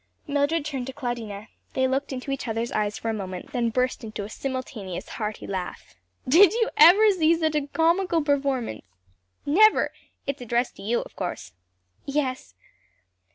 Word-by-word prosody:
Mildred 290 +2 0
turned 270 -4 -4
to 265 - -6
Claudina. 230 -6 -5 0.3
They 260 0 +2
looked 270 +2 -1
into 265 +1 -5
each 275 -2 -3
other's 225 +1 -2
eyes 210 -1 -1
for 225 - -3
a - - 0
moment, 185 -4 -6
then 240 -2 0
burst 255 +2 -1
into 215 -2 -5
a 200 - -7
simultaneous 245 -8 -5
hearty 210 -2 -4
laugh. 185 -2 -5 0.3
"Did 335 +8 +7 0.2
ever 355 +8 +8
you 420 - +6
see 335 -2 +3
such 315 -2 0
a 295 -2 -1
comical 335 +2 +2
performance?" 275 - 0 0.6
"Never! 425 +9 +5 0.3
It's 275 -1 -3
addressed 240 +1 -1
to - - -11
you 230 +4 0
of - - -12
course?" 175 - -5 0.5
"Yes." 265 - -2
260 Hz, 160 wpm, -25 LUFS, 220-295 Hz, 0.6 s, ever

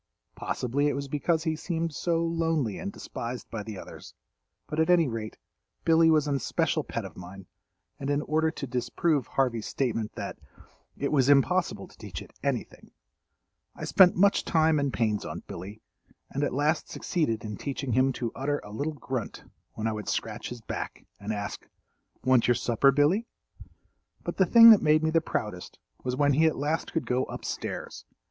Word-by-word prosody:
Possibly 135 +4 -1
it 145 - 0
was 140 0 -4
because 160 +3 0
he 160 -2 0
seemed 165 0 -3
so 165 +1 0
lonely 165 -8 0
and 200 - -4
despised 120 -9 -6
by 115 - -4
the 105 -1 -7
others, - - -11 0.5
but 155 - -4
at 160 +2 +2
any 170 -3 +5
rate, 115 -3 -5 0.5
Billy 165 0 +5
was 155 -2 +4
an 145 - 0
especial 135 - 0
pet - - -4
of - - -10
mine, 90 +1 -10 0.5
and 135 - -3
in 145 +1 +1
order 160 +1 +1
to 140 - -5
disprove 125 +3 0
Harvey's 120 -5 0
statement 115 -5 -2
that, - - -6 0.6
"it 140 - -1
was 135 -3 +3
impossible 170 +6 +2
to - - -19
teach - - -7
it - - -12
anything," - - -3 0.9
I - - -8
spent 185 -3 +6
much 200 +3 +4
time 160 -2 +3
and 140 -1 0
pains 110 -4 0
on - - -6
Billy, 100 +5 -9 0.5
and 140 - -2
at - - 0
last 150 +4 0
succeeded 115 -11 -1
in 105 -1 -4
teaching 135 +2 -4
him 130 +2 +3
to 120 -3 -3
utter 145 +2 -1
a 105 - -10
little 145 +9 -2
grunt 130 -5 -5 0.3
when 110 - -5
I 110 - +1
would 105 -1 -5
scratch 110 0 -3
his 125 -1 -8
back - - -6
and 100 +2 -4
ask, 105 -1 -5 0.6
"Want 130 -2 +4
your 120 - +4
supper, 120 +4 +3
Billy?" 155 - +2 1.0
But - - -4
the 190 - +4
thing 230 +3 +10
that 215 - +7
made 155 +1 +4
me 160 - +2
the 165 0 +3
proudest 105 - -4 0.3
was 125 0 -1
when 145 +1 +3
he 160 +4 +4
at 160 - 0
last 150 +3 -1
could 165 - -1
go 125 +1 0
up - - -8
stairs. - - -5
140 Hz, 185 wpm, -28 LUFS, 115-160 Hz, 1.0 s, thing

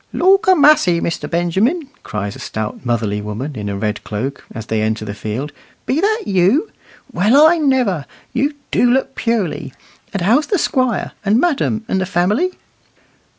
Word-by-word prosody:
"Lawk 390 +3 +3
a' 375 - +7
massey, 285 - +5
Mr. 170 - -3
Benjamin," 195 - 0
cries 105 -1 -5
a - - -11
stout, 110 +2 -5
motherly 110 -4 -1
woman 110 +8 -5
in 105 -3 -4
a 100 - -3
red 105 +1 -3
cloak, 130 +7 -4
as 110 - -7
they 110 -1 -1
enter 110 0 -1
the 105 - -5
field, 110 +8 -4 0.3
"be 280 +5 0
that 435 +2 +1
you? 195 - +2 0.4
Well, 235 - +5
I 335 +1 +5
never! 250 - +1 0.3
You 280 +4 0 0.2
do 245 - +3
look 265 +2 0
purely. 190 - -2 0.4
And 195 -4 -2
how's 250 - +3
the 400 - +1
Squire, 255 - 0
and 210 +3 +3
madam, 270 -9 0
and 190 - 0
the 185 - -2
family?" 205 - +1
190 Hz, 170 wpm, -18 LUFS, -, 0.4 s, a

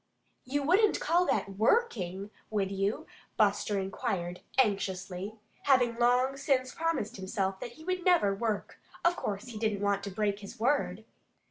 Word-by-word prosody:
"You 280 +2 -1
wouldn't 390 +8 +4
call 350 +2 +2
that 195 -1 -1
WORKING, 210 - +1 0.2
would 200 -3 0
you?" 195 +1 -1 0.3
Buster 205 0 +2
inquired 180 -2 -3 0.2
anxiously. 195 -3 0 0.3
Having 245 -4 +4
long 250 +3 +3
since 260 -2 +1
promised 325 -11 -1
himself 190 0 -2
that 240 - -6
he 315 - -14
would 365 +1 -2
never 340 - +4
work, 215 0 -3 0.3
of 345 0 +5
course 205 - -4
he 220 -3 -7
didn't 215 -2 0
want 200 -1 +1
to - - -3
break 205 0 -1
his 210 +4 -10
word. 280 +5 +1
215 Hz, 150 wpm, -30 LUFS, 195-270 Hz, 0.3 s, of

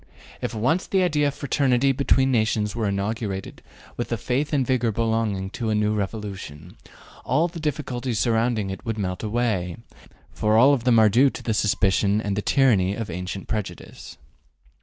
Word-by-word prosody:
If 115 - -3
once 130 - 0
the 190 -1 +2
idea 150 -4 +2
of 140 - -3
fraternity 135 -2 +2
between 135 0 +2
nations 110 -3 0
were 115 -3 -1
inaugurated 100 0 -3 0.4
with - - -3
the - - -1
faith 135 +4 -1
and 140 -4 +1
vigor 125 -3 +1
belonging 110 -3 -1
to 115 -1 -3
a 110 - +1
new 105 0 +1
revolution, 95 -6 -5 0.5
all 155 +6 +2
the 170 -1 -8
difficulties 130 -6 -3
surrounding 115 -3 +1
it 95 - -7
would 115 -2 -3
melt 90 -3 -3
away, 105 -6 -1 0.5
for 105 +1 +1
all 135 +5 +6
of 125 -4 -1
them 120 -2 +4
are 110 -1 +6
due 125 +7 +4
to 115 - -4
suspicion 100 -1 +2
and 100 -2 -2
the 105 - -1
tyranny 105 -8 +3
of 110 -4 -5
ancient 90 +3 -5
prejudice. 105 -3 -6
110 Hz, 170 wpm, -24 LUFS, 100-130 Hz, 0.5 s, all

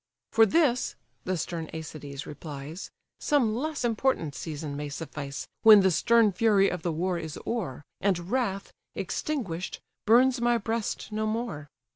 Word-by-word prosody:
"For 225 0 +6
this 255 - +2 0.3
(the 185 0 0
stern 165 0 -4
Æacides 150 -3 -7
replies) 150 +3 -7 0.3
Some 255 -7 +2
less 300 +1 -2
important 230 - 0
season 150 -1 -5
may 145 0 -4
suffice, 140 -1 -6
When 215 -2 +9
the 190 -1 +4
stern 225 +5 +4
fury 200 0 +4
of 180 - -4
the 170 - -1
war 175 +2 -1
is 160 -3 -6
o'er, 175 - -3 0.2
And 185 -2 0
wrath, 215 -7 -1 0.2
extinguish'd, 190 - -3 0.3
burns 245 +2 +5
my 240 0 +3
breast 225 0 -3
no 215 0 -1
more. 215 -10 -3
190 Hz, 145 wpm, -28 LUFS, 160-230 Hz, 0.3 s, When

